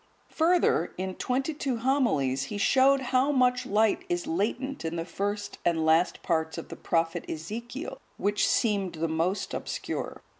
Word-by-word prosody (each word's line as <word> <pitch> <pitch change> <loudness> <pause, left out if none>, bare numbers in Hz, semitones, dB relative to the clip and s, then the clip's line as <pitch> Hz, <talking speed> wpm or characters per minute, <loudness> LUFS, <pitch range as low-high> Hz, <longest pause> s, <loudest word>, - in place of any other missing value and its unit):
Further, 330 - +2
in 185 +1 -3
twenty 265 +9 -1
two 275 -4 -2
homilies, 225 - +1
he 205 - -5
showed 270 +5 +4
how 260 +3 +4
much 250 -2 +2
light 215 +1 +2
is 175 0 -1
latent 240 +10 -2
in 165 +1 -3
the 165 -1 -3
first 205 +4 -3
and 165 -2 +1
last 160 +3 +3
parts 160 -2 0
of - - -7
the - - -6
prophet 165 +1 0
Ezekiel, 235 - -6 0.2
which 205 +1 +1
seemed 200 -5 +1
the 165 0 -1
most 165 +5 -1
obscure. - - -4
205 Hz, 155 wpm, -28 LUFS, 165-255 Hz, 0.2 s, showed